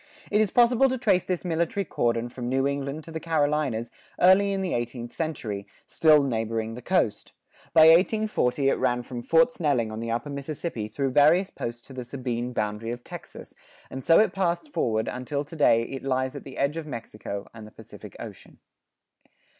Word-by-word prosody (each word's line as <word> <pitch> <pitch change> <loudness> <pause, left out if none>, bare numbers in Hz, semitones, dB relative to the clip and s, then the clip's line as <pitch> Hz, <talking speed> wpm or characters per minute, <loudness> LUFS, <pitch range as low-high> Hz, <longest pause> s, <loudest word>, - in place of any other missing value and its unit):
It 210 +1 +4
is 215 - +2
possible 245 +4 +4
to 260 - -1
trace 210 -7 +2
this 185 -1 -3
military 170 +3 -1
cordon 120 -4 -1
from 120 0 -5
New 135 +1 +1
England 140 +2 -3
to 165 - -11
the 160 - -4
Carolinas 145 -7 0 0.3
early 190 +2 +5
in 195 -1 -1
the 185 - -2
eighteenth 120 0 -4
century, 110 -11 -4 0.2
still 155 -2 +4
neighboring 115 -3 -2
the 125 - -8
coast; 125 - 0 0.4
by 160 - +6
1840 165 - +4
it - - 0
ran 125 -1 +1
from 120 -1 -6
Fort 165 - +4
Snelling 140 - 0
on 110 - -5
the 115 0 -4
upper 120 +5 -2
Mississippi 140 -4 -4
through 135 +5 -2
various 160 +8 +4
posts 120 0 -6
to 135 - -12
the 130 -1 -5
Sabine 125 -1 -4
boundary 105 -1 -3
of 120 +1 -5
Texas, - - -10 0.4
and 130 - -6
so 165 - +5
it 220 - +4
passed 190 - -1
forward 110 -1 0
until 135 +3 -3
to 155 - -11
day 115 -7 +4
it 135 +3 -6
lies 130 -1 -1
at - - -8
the 135 - -10
edge 140 +3 0
of 160 -2 -5
Mexico 105 -5 -6
and 110 -2 -10
the - - -15
Pacific - - -13
Ocean. - - -10
140 Hz, 190 wpm, -26 LUFS, 120-165 Hz, 0.4 s, by